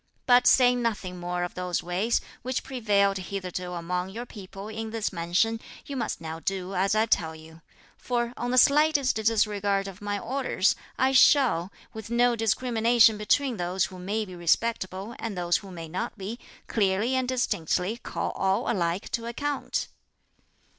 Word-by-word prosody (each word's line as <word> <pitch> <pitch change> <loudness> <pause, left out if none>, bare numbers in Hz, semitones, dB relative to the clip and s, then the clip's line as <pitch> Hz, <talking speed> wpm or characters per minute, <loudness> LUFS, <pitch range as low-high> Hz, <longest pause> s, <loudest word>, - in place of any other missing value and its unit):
But 245 -1 +5
saying 250 -1 +5
nothing 200 -6 -2
more 175 0 -2
of 175 - -4
those 180 -1 -2
ways, 185 +7 0 0.2
which 255 0 -2
prevailed 205 -6 +1
hitherto 185 -1 -5
among 180 +2 -3
your 230 +5 -6
people 195 -2 -9
in 220 +1 -5
this 220 -2 -2
mansion, 180 +7 +1 0.3
you 280 - -6
must 235 -4 -2
now 160 0 -6
do 190 +1 -3
as 195 +3 +1
I 215 +1 +3
tell 160 -7 0
you; 160 +1 -14 0.4
for 240 -1 -1
on 245 - -3
the 255 - +1
slightest 290 -1 +4
disregard 205 -3 +1
of 195 0 -10
my 205 0 -2
orders, 235 -4 0 0.2
I 260 +1 +3
shall, 250 - +5 0.2
with 220 -1 -8
no 240 0 +3
discrimination 230 0 +3
between 235 +4 +1
those 180 +1 0
who 185 +1 -10
may 210 +4 -2
be 185 - -10
respectable 190 +3 -1
and 225 -4 -4
those 175 -1 +2
who 200 - -11
may 165 -3 -7
not 180 +6 -4
be, 210 +4 -6 0.3
clearly 205 +3 +1
and 260 -1 +1
distinctly 205 -4 0
call - - -4
all 190 +3 0
alike 175 -3 -1
to 230 0 -2
account." 285 +4 -2
205 Hz, 165 wpm, -27 LUFS, 180-235 Hz, 0.4 s, But